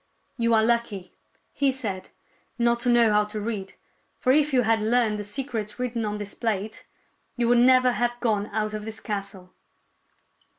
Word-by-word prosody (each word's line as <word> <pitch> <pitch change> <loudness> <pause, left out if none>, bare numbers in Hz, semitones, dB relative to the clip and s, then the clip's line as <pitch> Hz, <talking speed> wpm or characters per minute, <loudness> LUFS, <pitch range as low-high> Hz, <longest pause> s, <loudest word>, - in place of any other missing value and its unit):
" - - -44
You 230 -1 +3
are 220 - +4
lucky," 220 -5 -1 0.4
he 280 -1 +2
said, 210 -8 -5 0.3
" - - -37
not 235 0 +2
to 245 - 0
know 235 -3 +5
how 210 0 +4
to 210 +1 -6
read. 205 -3 -4 0.4
For 255 - +2
if 300 +1 +3
you 255 -2 +3
had 225 0 +2
learned 220 -1 +2
the - - -4
secrets 215 -2 -4
written 240 -2 -2
on 210 0 -3
this 205 -1 -7
plate, 215 -2 -3 0.5
you 240 -1 0
would 240 0 +5
never 255 0 +5
have 240 0 -1
gone 210 -4 0
out 215 0 -2
of 215 0 -4
this 220 0 -7
castle." 200 -3 -6
225 Hz, 185 wpm, -25 LUFS, 210-240 Hz, 0.5 s, know